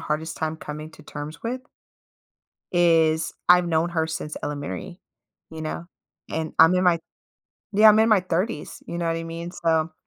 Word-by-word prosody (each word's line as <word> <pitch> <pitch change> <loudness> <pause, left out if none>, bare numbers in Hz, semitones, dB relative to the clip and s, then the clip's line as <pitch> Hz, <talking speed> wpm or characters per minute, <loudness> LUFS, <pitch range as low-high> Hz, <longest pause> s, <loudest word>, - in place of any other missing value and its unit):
hardest 160 +1 -3
time 160 0 -2
coming 150 0 -7
to 155 - -15
terms 150 +1 -8
with, 250 +3 -3 1.1
is 165 -2 +3 0.2
I've 180 0 +6
known 165 +1 +1
her 160 -2 0
since 155 -1 -5
elementary, 150 +5 -5 0.5
you 160 -1 -7
know, 165 +2 -5 0.4
and 160 -1 -3
I'm 165 +3 +7
in 180 0 +2
my 170 -2 +4 0.7
Yeah, 215 +2 +7
I'm 215 +1 +7
in 220 - +5
my 215 -4 +5
30s, 180 0 -3
you 170 - -5
know 170 - -1
what 165 0 0
I 165 - -4
mean? 165 +1 -6
So 165 -2 0
165 Hz, 175 wpm, -24 LUFS, 155-180 Hz, 1.1 s, I'm